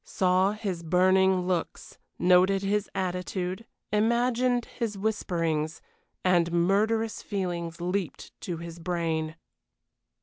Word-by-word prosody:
Saw 185 +2 +2
his 200 -5 -4
burning 185 +2 +3
looks; 180 -2 -3 0.2
noted 185 +2 +4
his 205 +1 0
attitude; 185 +2 -3 0.2
imagined 240 +3 +2
his 225 -4 -4
whisperings 170 -7 -1 0.5
and 175 -2 +3
murderous 210 +6 +1
feelings 175 -4 -3
leaped 180 0 -3
to 175 -2 -4
his 170 0 -8
brain. 165 -2 -2
185 Hz, 100 wpm, -27 LUFS, 170-205 Hz, 0.5 s, noted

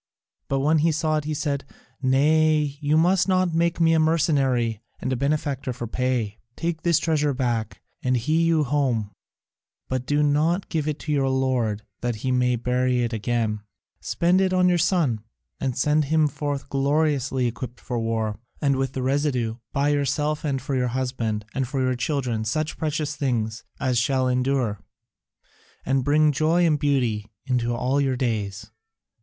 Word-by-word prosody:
But 135 0 0
when 155 +3 +3
he 165 +2 +3
saw 155 0 0
it 150 - -3
he 155 0 -2
said: 140 -1 -2 0.4
"Nay, 150 +2 +3
you 150 +1 +2
must 180 +4 +3
not 185 -2 +2
make 170 +1 +1
me 165 -1 +4
a 160 - +4
mercenary 135 -8 +2 0.2
and 130 - -2
a - - +1
benefactor 140 -1 -1
for 120 0 -5
pay; 120 -3 -1 0.2
take 165 -1 -3
this 170 -3 +3
treasure 150 -4 +1
back 120 -5 -2 0.2
and 125 0 +1
hie 135 +6 -2
you 165 -1 +3
home, 130 -7 0 0.8
but 130 -1 -2
do 145 0 +2
not 155 +6 +1
give 155 -3 -1
it 150 -1 -1
to 155 - -4
your 135 -2 +2
lord 125 -5 0 0.2
that 120 -1 -2
he 130 - +1
may 125 -1 +2
bury 125 +1 +1
it 120 0 -2
again; 110 -1 -1 0.4
spend 180 +3 +2
it 190 -1 +1
on 180 0 +4
your 175 -1 +3
son, 160 - +1 0.4
and 130 -2 -2
send 150 +3 +2
him 155 +1 +3
forth 145 0 -4
gloriously 140 -2 +1
equipped 120 +1 -4
for 120 -2 -3
war, 110 -2 -2 0.2
and 140 -3 +2
with 135 -1 -1
the 130 - -3
residue 130 -4 0
buy 140 +1 +1
yourself 145 +1 0
and 135 -4 -1
for 140 - -3
your 125 -1 +1
husband 120 -4 -2
and 135 -1 -2
your 130 -2 +1
children 125 -3 -1
such 155 +8 -2
precious 150 -1 -2
things 115 -6 -2 0.2
as 125 -3 +1
shall 130 +1 +1
endure, 125 -4 0 1.1
and 135 0 +1
bring 150 +2 +4
joy 160 +4 +2
and 155 -3 +2
beauty 125 -8 0 0.2
into 125 -3 0
all 130 +4 +1
your 135 -2 0
days. 105 -4 -2
135 Hz, 170 wpm, -24 LUFS, 125-155 Hz, 1.1 s, me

